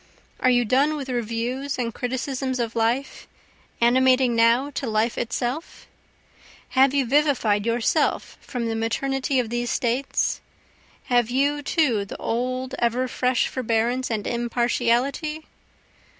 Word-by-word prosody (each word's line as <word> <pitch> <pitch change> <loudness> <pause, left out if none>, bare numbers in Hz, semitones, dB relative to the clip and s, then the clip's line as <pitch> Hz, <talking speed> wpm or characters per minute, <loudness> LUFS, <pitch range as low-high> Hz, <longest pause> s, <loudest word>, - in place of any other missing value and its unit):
Are 255 - +3
you 245 -1 +3
done 275 +7 +2
with 275 -3 -6
reviews 245 +3 -2
and 235 -2 -2
criticisms 260 +1 -3
of 235 -1 -2
life? 230 +4 -1 0.5
animating 255 +1 +4
now 235 +5 +3
to 275 - -4
life 220 +1 0
itself? 245 +6 -4 0.8
Have 270 +1 +3
you 275 -2 +2
vivified 240 -6 +2
yourself 240 +6 0
from 245 -3 -4
the 225 - -1
maternity 265 +4 -1
of 235 -3 -2
these 240 0 -1
States? 250 +4 0 0.6
Have 245 -3 +2
you 285 +3 +1
too 275 - +1
the 200 - -8
old 255 +2 -2
ever 240 +2 +1
fresh 250 0 +1
forbearance 240 +1 -1
and 215 -3 -2
impartiality? 245 +5 0
250 Hz, 125 wpm, -24 LUFS, 235-270 Hz, 0.8 s, animating